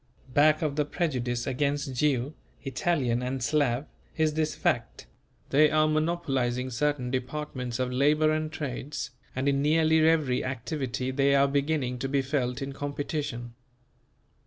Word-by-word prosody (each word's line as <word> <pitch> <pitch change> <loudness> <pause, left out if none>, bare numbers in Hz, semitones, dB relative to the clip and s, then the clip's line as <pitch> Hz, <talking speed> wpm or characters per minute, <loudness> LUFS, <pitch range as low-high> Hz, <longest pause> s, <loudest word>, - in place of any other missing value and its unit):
Back 155 +2 +4
of 150 -2 -1
the 150 - +3
prejudice 125 -7 -2
against 140 +1 -1
Jew, 135 +1 +1 0.3
Italian 135 -3 0
and 130 0 -3
Slav, 140 -2 +1 0.3
is 155 -1 +2
this 155 0 -1
fact: - - -1 0.5
they 150 +2 +6
are 155 0 +3
monopolizing 135 -6 0
certain 130 -1 0
departments 130 -2 -3
of 130 -1 -1
labour 150 +4 +3
and 155 0 -1
trades, 140 -2 -5 0.2
and 130 +2 -1
in 140 0 +2
nearly 160 +2 +4
every 155 -5 +3
activity 130 -1 -3
they 140 +1 +3
are 140 0 +5
beginning 140 -3 0
to 135 +2 -2
be 140 0 +1
felt 135 -1 -1
in 135 0 -5
competition. 140 -4 -4
140 Hz, 140 wpm, -28 LUFS, 125-155 Hz, 0.5 s, they